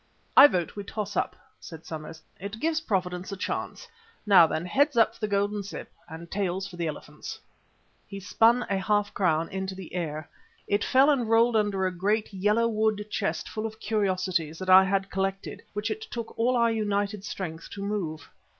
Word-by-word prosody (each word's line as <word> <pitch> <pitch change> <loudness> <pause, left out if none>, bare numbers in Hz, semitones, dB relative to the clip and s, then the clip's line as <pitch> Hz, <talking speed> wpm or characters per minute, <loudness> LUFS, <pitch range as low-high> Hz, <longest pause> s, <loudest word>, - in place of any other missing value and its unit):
"I 275 - +11
vote 175 - -2
we 205 - -5
toss 210 0 -5
up," - - -1 0.2
said 160 -2 -11
Somers; 160 0 -8 0.2
"it 200 +3 -6
gives 315 +3 0
Providence 185 - -2
a 195 - -5
chance. 485 - -4 0.4
Now 195 -6 +7
then, 160 +2 -3
heads 285 - +2
for 230 -1 +3
the 215 - -1
Golden 205 0 0
Cyp, 200 - -8 0.2
and 165 +2 -9
tails 190 -1 -1
for 190 - -11
the 170 -1 -2
elephants." 150 - -7 0.7
He 200 - -7
spun 230 +5 +3
a 195 -1 0
half 205 +1 0
crown 165 -4 +1
into 190 0 -4
the 190 -2 -10
air. 155 -4 -3 0.4
It 205 0 +1
fell 270 +3 +5
and 245 -6 0
rolled 230 +1 +4
under 205 -3 +1
a 185 -1 -2
great, 205 +4 0
yellow 210 +4 +2
wood 215 -2 0
chest 205 - -2
full 220 0 -3
of 220 0 -11
curiosities 185 -7 -1
that 185 +1 -1
I 190 +1 +9
had 195 0 -1
collected, 195 0 -3
which 210 +1 -2
it 435 - -4
took 230 -1 -6
all 245 +2 +2
our 235 -1 +3
united 205 -2 -1
strength 165 -5 -6
to 200 - -6
move. 195 -7 -3
200 Hz, 185 wpm, -27 LUFS, 185-220 Hz, 0.7 s, I